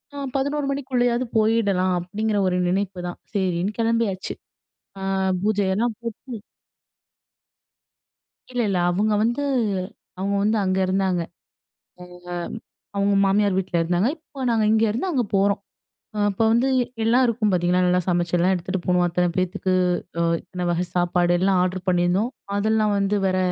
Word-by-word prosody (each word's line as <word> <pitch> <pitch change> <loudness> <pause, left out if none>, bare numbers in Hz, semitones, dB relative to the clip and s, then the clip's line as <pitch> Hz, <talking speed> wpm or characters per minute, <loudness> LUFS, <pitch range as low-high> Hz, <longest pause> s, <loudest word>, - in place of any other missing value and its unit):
ஆ - - -6 0.2
11:00 285 +2 0
மணிக்குள்ளேயாவது 250 -3 0
போயிடலாம் 205 -4 +2
அப்டிங்கிற 205 +4 -2
ஒரு 180 - +1
நினைப்புதான். 180 -2 -3
சரின்னு, 190 +1 -1
கிளம்பியாச்சு. 225 -4 0 0.7
அ - - -6 0.4
பூஜயெல்லாம் 210 +2 +1
போட்டு 230 0 -7 2.1
இல்ல, 250 -1 -2
இல்ல. 190 - +1
அவங்க 210 +4 +1
வந்து 240 +5 0 0.8
அவங்க 200 +1 -1
வந்து 215 +1 +2
அங்க 185 0 0
இருந்தாங்க. 185 -1 +1
அவங்க 170 - -12 1.6
அவங்க 200 0 +2
மாமியார் 200 0 +2
வீட்ல 190 -2 -1
இருந்தாங்க, 175 +7 +1
இப்போ 305 -3 -17
நாங்க 225 -2 +2
இங்கே 220 +1 +3
இருந்து 240 - -2
அங்க 265 -7 +1
போறோம். 200 +1 +2 0.6
அ - - -4
இப்ப 200 +3 -1
வந்து 235 +3 +3
எ - - +2 0.2
எல்லாம் 240 +4 +4
இருக்கும் 220 -3 +1
பாத்தீங்கன்னா, 180 0 +2
நல்லா 180 0 +3
சமைச்சலாம் 175 +1 +2
எடுத்துட்டு 185 +1 -3
போவோம் 180 -1 +3
அத்தன 175 +1 +1
பேத்துக்கு 185 +1 -1 0.5
அ - - +2 0.2
இத்தன 180 -1 -6
வகை 175 +1 +1
சாப்பாடு 175 0 +2
எல்லாம் 190 +1 +2
ஆர்ட்ர் 185 0 -1
பண்ணியிருந்தோம். 180 +5 +2 0.3
அதெல்லாம் 215 0 +2
வந்து 200 +1 +1
வர 185 0 0
195 Hz, 140 wpm, -23 LUFS, 180-225 Hz, 2.1 s, எல்லாம்